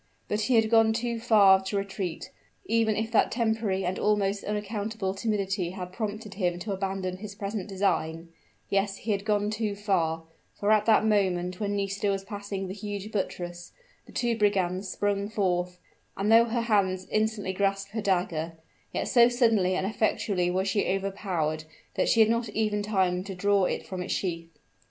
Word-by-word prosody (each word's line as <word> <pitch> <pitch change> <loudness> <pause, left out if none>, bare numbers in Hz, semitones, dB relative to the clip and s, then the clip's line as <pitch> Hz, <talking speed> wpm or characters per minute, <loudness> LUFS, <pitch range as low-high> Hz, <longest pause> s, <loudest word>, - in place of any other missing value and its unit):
But 210 +1 -1
he 245 +4 +2
had 225 -1 +3
gone 225 -1 +5
too 235 0 -2
far 205 -5 +6
to 200 +1 -1
retreat 195 -3 -4 0.3
even 225 -1 +2
if 220 +1 -2
that 225 - +3
temporary 220 -5 0
and 180 +1 -2
almost 205 -1 +1
unaccountable 210 -1 -3
timidity 195 -3 -1
had 180 -1 -6
prompted 215 0 -4
him 180 -3 -1
to 210 - -4
abandon 190 -1 -2
his 200 +1 -8
present 200 -1 -4
design; 165 -4 -1 0.4
yes, 195 0 0
he 220 - -3
had 200 -1 0
gone 210 -1 +1
too 215 -1 -2
far 170 -6 0 0.4
for 205 +1 +2
at 215 0 +3
that 220 -1 +5
moment 185 -4 +1
when 205 -1 -1
Nisida 200 0 -1
was 195 -1 -1
passing 200 -1 -5
the 185 - -5
huge 205 0 -6
buttress, 175 -4 -4 0.3
the - - -13
two 240 -1 0
brigands 195 -3 +1
sprung 200 +1 -1
forth: 180 -4 -1 0.4
and 205 +2 +1
though 230 +1 +7
her 235 0 -1
hand 195 -5 +1
instantly 215 -3 0
grasped 195 0 -1
her 220 +1 -3
dagger, 175 -4 0 0.4
yet - - -2
so 240 -1 +6
suddenly 225 -7 +2
and 190 - -1
effectually 200 -3 0
was 190 +2 0
she 200 +1 +1
overpowered 185 -5 -2 0.3
that - - +1
she 225 - +5
had 220 - +6
not 230 -1 0
even 210 -1 0
time 190 -3 +1
to 195 -1 -6
draw 200 +1 +2
it - - -2
from 185 -1 -5
its 180 - -2
sheath. 170 -3 -3
200 Hz, 180 wpm, -27 LUFS, 190-215 Hz, 0.4 s, though